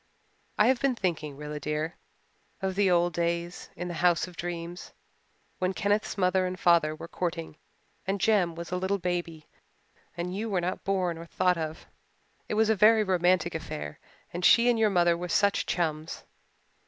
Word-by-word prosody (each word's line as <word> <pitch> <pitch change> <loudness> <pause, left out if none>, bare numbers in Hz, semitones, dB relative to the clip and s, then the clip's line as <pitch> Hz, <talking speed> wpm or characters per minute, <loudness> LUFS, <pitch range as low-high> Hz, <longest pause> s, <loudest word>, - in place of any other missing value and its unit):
"I 210 - +5
have 255 0 +3
been 275 -2 +2
thinking, 160 -8 -3
Rilla 150 0 -6
dear, 150 +3 -3 0.6
of 190 -1 -2
the 195 0 +2
old 175 -1 +3
days 170 +1 -2
in 175 +1 -5
the 175 - -4
House 175 0 +2
of 180 - -13
Dreams, 175 0 -6 0.7
when 185 +1 0
Kenneth's 205 +1 0
mother 185 0 +2
and 180 0 -5
father 165 -3 +3
were 165 - -9
courting 165 -3 -4 0.5
and 195 +1 0
Jem 190 -6 +2
was 170 +1 -7
a 180 - 0
little 190 +2 0
baby 175 -4 -3 0.7
and 180 +2 -3
you 220 +3 -3
were 190 -3 +1
not 175 +1 -3
born 185 -4 0
or 170 - -9
thought 180 +1 +1
of. 160 0 -5 0.6
It - - -1
was 220 0 +3
a - - +3
very 215 +2 +5
romantic 180 -2 +2
affair 75 - -6 0.3
and 175 +1 -4
she 235 +6 +6
and 230 - 0
your 220 -1 +4
mother 175 -3 +3
were 175 +1 -5
such 200 +3 +2
chums. 160 -2 -2
175 Hz, 180 wpm, -28 LUFS, 170-195 Hz, 0.7 s, she